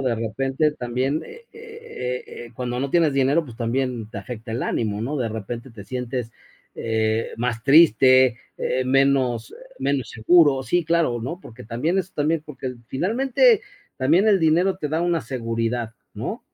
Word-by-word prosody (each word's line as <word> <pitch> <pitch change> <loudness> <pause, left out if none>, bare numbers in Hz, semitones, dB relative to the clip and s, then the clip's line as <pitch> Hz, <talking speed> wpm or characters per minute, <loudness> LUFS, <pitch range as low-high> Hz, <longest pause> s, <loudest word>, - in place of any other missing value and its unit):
de 130 -3 0
repente 135 +7 0
también, 130 +4 -2
eh 465 +1 -13
eh 450 - -6 0.2
eh, 115 - -16
cuando 125 0 -3
no 140 - -1
tienes 165 -3 +3
dinero, 140 +4 +2
pues 120 -5 -11
también 120 -1 -2
te 110 - -10
afecta 110 +2 -7
el 115 - -2
ánimo, 105 -2 -1
¿no? 140 +5 -2
De 120 - -1
repente 115 +3 -6
te 105 -3 -11
sientes, 125 0 -4 0.4
eh, 110 0 -1
más 115 -1 -2
triste, 130 -4 +6 0.2
eh, 130 +1 -1
menos 130 -3 +2
eh, - - -10 0.2
menos 135 -5 -1
seguro 140 +3 +4
Sí, 175 +5 +1
claro, 160 -8 +1
¿no? 135 +9 -5
Porque 120 -6 -12
también 130 - -1
eso 190 0 -3
también 150 +1 0
porque 130 -3 -6
finalmente, 265 - +3 0.4
también 160 +10 +3
el 200 -3 +4
dinero 170 +4 +3
te 150 - -3
da 160 +3 0
una 175 -2 +1
seguridad, 115 -2 -3 0.2
¿no? - - -4
130 Hz, 165 wpm, -23 LUFS, 115-160 Hz, 0.4 s, triste